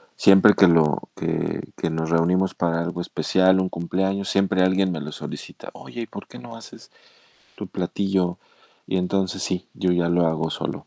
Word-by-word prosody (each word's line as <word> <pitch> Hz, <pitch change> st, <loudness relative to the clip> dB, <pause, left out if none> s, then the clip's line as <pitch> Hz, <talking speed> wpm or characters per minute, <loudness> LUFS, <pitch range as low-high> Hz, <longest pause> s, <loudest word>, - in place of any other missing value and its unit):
siempre 100 Hz, +1 st, +6 dB
que 95 Hz, -, +6 dB
lo 80 Hz, -3 st, +2 dB
que -, -, -2 dB, 0.2 s
que 85 Hz, -, -1 dB
nos 80 Hz, 0 st, -2 dB
reunimos 90 Hz, +3 st, +2 dB
para 85 Hz, -1 st, 0 dB
algo 85 Hz, +1 st, -4 dB
especial, 95 Hz, +1 st, +2 dB
un 95 Hz, -, 0 dB
cumpleaños, 95 Hz, +3 st, -2 dB
siempre 95 Hz, -1 st, +2 dB
alguien 95 Hz, 0 st, +2 dB
me 80 Hz, -4 st, -4 dB
lo 75 Hz, -, -6 dB
solicita: -, -, -9 dB
"Oye, 120 Hz, -, -9 dB
¿y -, -, -8 dB
por 100 Hz, -, -10 dB
qué -, -, -12 dB
no 115 Hz, -1 st, -11 dB
haces 115 Hz, -, -14 dB, 0.7 s
tu -, -, -6 dB
platillo?". 95 Hz, -3 st, -1 dB, 0.5 s
Y 95 Hz, -, -2 dB
entonces, 95 Hz, 0 st, -1 dB
sí, 90 Hz, -1 st, -3 dB
yo 90 Hz, -1 st, 0 dB
ya 85 Hz, -1 st, +1 dB
lo 85 Hz, 0 st, +2 dB
hago 80 Hz, 0 st, -1 dB
solo. -, -, -5 dB
90 Hz, 180 wpm, -23 LUFS, 85-95 Hz, 0.7 s, siempre